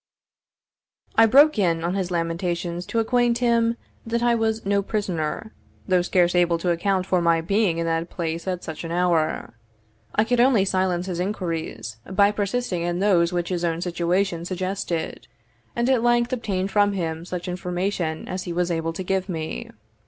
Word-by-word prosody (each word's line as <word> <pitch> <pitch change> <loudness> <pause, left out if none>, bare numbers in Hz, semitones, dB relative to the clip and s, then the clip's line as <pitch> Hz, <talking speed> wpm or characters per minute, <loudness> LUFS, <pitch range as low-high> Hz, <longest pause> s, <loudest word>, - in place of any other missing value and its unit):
I 225 0 +7
broke 280 +2 +6
in 165 -4 +1
on 175 +1 0
his 190 -2 -1
lamentations 170 0 -2
to - - -3
acquaint 240 +1 +2
him 235 -1 +2 0.3
that 235 +1 -1
I 240 0 +4
was 225 -1 0
no 200 0 +2
prisoner, 200 -1 -3 0.3
though 185 -2 +3
scarce 175 -1 +2
able 175 -1 +3
to 175 +1 0
account 185 +2 0
for 185 -2 +1
my 170 -1 +3
being 195 +1 +1
in 170 - -1
that 165 +1 -1
place 165 0 -4
at 180 -1 -2
such 160 0 -6
an 165 - -5
hour. 170 -6 0 0.6
I 210 - +4
could 240 +2 0
only 240 -5 +4
silence 185 -2 0
his 180 -2 -4
inquiries 165 - -3
by 200 +2 +4
persisting 205 -2 -2
in 175 0 -1
those 180 -3 +3
which 175 -1 -2
his 175 -2 -2
own 165 -1 0
situation 175 0 0
suggested; 185 -2 -3 0.5
and 235 +1 +1
at 260 -3 +3
length 240 +1 +2
obtained 195 -5 -2
from 205 0 +3
him 165 -3 -3
such 180 0 -5
information 180 -2 -2
as 185 0 -4
he 175 - -4
was 175 0 0
able 165 0 -1
to 185 - -5
give 190 +1 -1
me. 160 -3 -4
180 Hz, 175 wpm, -24 LUFS, 170-205 Hz, 0.6 s, I